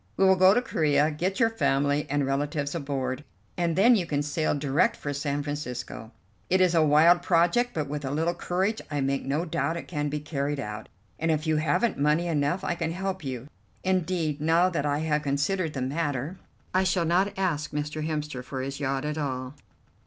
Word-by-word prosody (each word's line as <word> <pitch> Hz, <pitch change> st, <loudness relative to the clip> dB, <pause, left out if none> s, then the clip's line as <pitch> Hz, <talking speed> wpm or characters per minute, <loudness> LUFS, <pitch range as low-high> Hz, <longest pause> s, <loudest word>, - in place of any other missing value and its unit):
We 195 Hz, -, +4 dB
will 190 Hz, 0 st, +6 dB
go 185 Hz, +2 st, +6 dB
to 245 Hz, -, +2 dB
Corea, 150 Hz, -, +2 dB
get 180 Hz, +6 st, -2 dB
your 230 Hz, -2 st, +4 dB
family 145 Hz, -8 st, +1 dB
and 145 Hz, 0 st, +1 dB
relatives 140 Hz, +1 st, -1 dB
aboard, 140 Hz, -3 st, -3 dB, 0.3 s
and 170 Hz, -2 st, 0 dB
then 235 Hz, +7 st, +6 dB
you 180 Hz, -6 st, 0 dB
can 145 Hz, -2 st, 0 dB
sail 150 Hz, +1 st, 0 dB
direct 145 Hz, +1 st, +2 dB
for 145 Hz, -, -4 dB
San 145 Hz, 0 st, -2 dB
Francisco. 125 Hz, -6 st, -5 dB, 0.4 s
It 185 Hz, -, +3 dB
is 180 Hz, -2 st, +4 dB
a 165 Hz, -, +4 dB
wild 160 Hz, +4 st, +5 dB
project, 175 Hz, +9 st, +2 dB
but 155 Hz, -3 st, -1 dB
with 145 Hz, +1 st, -4 dB
a 135 Hz, -, -2 dB
little 160 Hz, +5 st, 0 dB
courage 190 Hz, +5 st, -1 dB
I 145 Hz, -1 st, -2 dB
make 135 Hz, 0 st, 0 dB
no 145 Hz, +5 st, -1 dB
doubt 160 Hz, 0 st, -1 dB
it -, -, -7 dB
can 150 Hz, -3 st, -2 dB
be 150 Hz, +1 st, -2 dB
carried 145 Hz, -1 st, -2 dB
out, 105 Hz, -4 st, -6 dB, 0.3 s
and 165 Hz, -, 0 dB
if 155 Hz, 0 st, +1 dB
you 155 Hz, -1 st, +2 dB
haven't 155 Hz, +9 st, +1 dB
money 150 Hz, +4 st, +2 dB
enough 155 Hz, +1 st, 0 dB
I -, -, 0 dB
can 165 Hz, -1 st, -2 dB
help 190 Hz, 0 st, -3 dB
you. 130 Hz, -1 st, -5 dB, 0.4 s
Indeed, 175 Hz, -5 st, 0 dB
now 165 Hz, +4 st, +4 dB
that 150 Hz, -5 st, -1 dB
I 145 Hz, 0 st, +1 dB
have 150 Hz, -1 st, +1 dB
considered 150 Hz, +4 st, 0 dB
the 130 Hz, -, -2 dB
matter, 145 Hz, +3 st, -2 dB, 0.3 s
I 185 Hz, +1 st, +3 dB
shall 185 Hz, -2 st, +1 dB
not 190 Hz, +4 st, +1 dB
ask 165 Hz, -6 st, -1 dB
Mr. 150 Hz, +1 st, -3 dB
Hemster 150 Hz, -4 st, -3 dB
for 130 Hz, 0 st, -5 dB
his 135 Hz, +1 st, -5 dB
yacht 135 Hz, 0 st, -1 dB
at 150 Hz, +1 st, -2 dB
all. 130 Hz, -2 st, -3 dB
150 Hz, 205 wpm, -27 LUFS, 145-175 Hz, 0.4 s, will